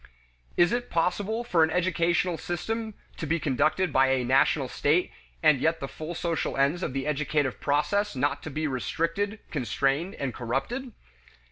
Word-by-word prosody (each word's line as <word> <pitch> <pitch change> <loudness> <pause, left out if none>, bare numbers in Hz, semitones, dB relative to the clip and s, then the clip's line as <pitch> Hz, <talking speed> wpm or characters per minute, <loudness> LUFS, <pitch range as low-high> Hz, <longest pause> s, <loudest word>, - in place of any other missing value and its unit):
Is 175 0 +5
it 245 0 -1
possible 200 +7 0
for 175 -8 +3
an 160 - +3
educational 175 0 +1
system 220 +7 -4 0.2
to 160 - -4
be 165 +3 +1
conducted 155 +4 +1
by 135 0 +5
a 130 -1 +2
national 135 +2 +3
state 155 +7 +1 0.3
and 150 -4 +5
yet 160 +1 +2
the 135 - -4
full 155 +4 -7
social 170 -4 -2
ends 140 +6 +2
of 135 - -2
the 135 0 -2
educative 150 -2 0
process 175 +7 +1
not 140 +2 0
be 155 +3 -2
restricted, 165 - -1
constrained, 140 +5 0
and 135 -4 -3
corrupted? 135 - -3
160 Hz, 155 wpm, -27 LUFS, 140-180 Hz, 0.3 s, Is